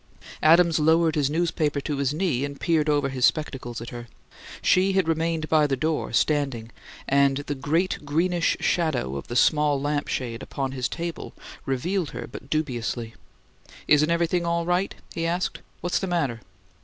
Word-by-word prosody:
Adams 165 +1 +5
lowered 160 +1 +3
his 145 -2 +1
newspaper 155 -2 0
to 145 0 -3
his 140 -1 0
knee 150 -5 0
and 140 -1 -5
peered 155 -3 +1
over 145 -2 +2
his 130 -2 -4
spectacles 130 -5 0
at 115 - -7
her. 120 -1 -8 0.5
She 190 +1 +3
had 190 -3 +2
remained 165 -1 0
by 155 -2 +4
the 135 - 0
door, 155 +3 -1
standing, 135 -7 0 0.4
and 140 0 +3
the 145 0 -3
great 160 +7 0
greenish 170 +4 +1
shadow 145 - 0
of 70 - -6
the 120 - -5
small 150 +2 +3
lamp 145 +1 -1
shade 120 -1 -3
upon 135 -1 -4
his 130 -2 -2
table 170 -1 -5 0.3
revealed 165 +6 -1
her - - -6
but 130 - -11
dubiously. 120 -6 -2 0.7
"Isn't 150 +1 +4
everything 170 +1 +1
all 170 0 0
right?" 180 +3 0 0.2
he 165 0 -2
asked. 175 +2 -1 0.2
"What's 175 - 0
the 190 - -3
matter?" 145 -10 -1
150 Hz, 165 wpm, -25 LUFS, 135-170 Hz, 0.7 s, Adams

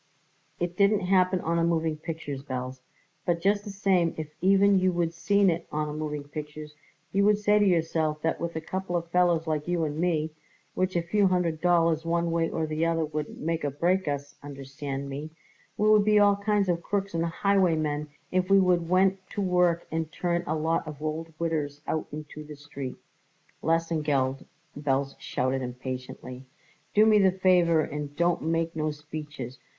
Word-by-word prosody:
"It 175 0 -2
didn't 200 +2 +3
happen 185 0 +2
on 170 +1 0
a - - +2
moving 165 -2 +1
pictures, 155 -3 -6
Belz, 130 -1 -5 0.4
but 175 -2 0
just 200 +3 +1
the 210 - -7
same 190 -4 +1
if 155 -1 -6
even 195 +1 +5
you 185 0 +2
would 170 -1 -1
seen 200 +3 +2
it 165 0 -4
on 150 0 -1
a - - -5
moving 150 -1 -4
pictures 150 +1 -8 0.4
you 200 +1 +2
would 210 0 +5
say 210 0 +3
to 205 - +4
yourself 160 -3 +1
that 165 - 0
with 170 -1 -3
a 160 - -2
couple 185 +2 -4
of 170 0 -6
fellers 175 -2 +3
like 155 -1 -2
you 175 -2 0
and 150 0 -2
me, 160 -3 0 0.4
which 185 0 -1
a 170 - +1
few 200 +4 +2
hundred 175 -4 0
dollars 170 -2 +3
one 170 0 0
way 165 0 +1
or 160 - -1
the 155 +1 -2
other 165 -1 +1
wouldn't 150 0 -5
make 165 +1 -2
or 145 - +1
break 175 +6 0
us, 145 0 -3
understand 140 0 -6
me, 140 +3 -5 0.5
we 210 - +2
would 215 -1 +6
be 210 0 +4
all 205 -1 +6
kinds 200 -1 +1
of 170 -1 0
crooks 200 +2 -2
and 165 0 0
highwaymen 165 -5 +1 0.2
if 185 0 +1
we 195 0 +6
would 175 -3 +2
went 190 +1 +3
to - - -6
work 180 -3 +2
and 160 0 -2
turn 175 -1 -1
a 155 - 0
lot 160 +1 0
of 150 -2 -7
old 155 +2 -4
widders 155 -4 -2
out 160 - -2
into 150 0 -8
the 150 0 -10
street." 140 -2 -7 0.7
"Lesengeld," 150 -5 0 0.3
Belz 140 -1 0
shouted 130 +1 -1
impatiently, 125 0 -6 0.5
"do 210 +1 +7
me 215 -1 +6
the 190 -2 +5
favour 180 -3 +3
and 150 -1 -5
don't 170 +2 +1
make 165 +1 -1
no 155 -1 0
speeches. 150 -4 -7
165 Hz, 185 wpm, -27 LUFS, 150-180 Hz, 0.7 s, do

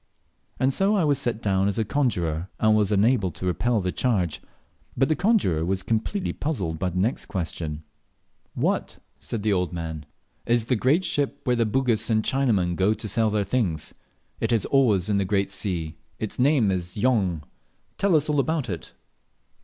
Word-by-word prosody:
And 130 +1 +2
so 195 +6 +2
I 195 - +2
was 145 -3 +2
set 120 -1 -2
down 95 -1 +2
as 100 - -1
a 110 - +1
conjurer, 90 - -1
and 110 0 +4
was 105 -1 +2
unable 105 0 +3
to 90 - -6
repel 115 +6 +1
the 90 -2 -1
charge. 95 -10 0 0.6
But 135 +2 +2
the 155 - +3
conjurer 180 - +2
was 95 +2 -1
completely 115 - -1
puzzled 95 - -3
by 90 - 0
the 90 - -5
next 110 +8 0
question: 80 -4 -4 0.7
"What," - - -1 0.2
said 110 -3 -4
the 105 -1 +2
old 90 -3 -1
man, 80 -3 -5 0.4
"is 120 -1 +2
the 125 - +1
great 140 - +2
ship, 145 -5 -1
where 125 - +1
the 115 -2 +1
Bugis 120 -1 +1
and 110 -1 +2
Chinamen 105 -11 +1
go 100 +4 +2
to 110 - -6
sell 110 +1 +1
their 105 -1 0
things? 95 - -1 0.5
It - - -1
is 115 -5 +2
always 110 -10 +3
in 105 -1 +1
the - - +2
great 100 0 0
sea 80 -6 -3 0.2
its 110 +1 -5
name 130 -6 +3
is 90 -1 -3
Jong; 100 -9 +1 0.6
tell 195 -4 +3
us 150 -1 +3
all 150 -1 +1
about 150 -4 0
it." 85 - -7
110 Hz, 185 wpm, -25 LUFS, 90-130 Hz, 0.7 s, and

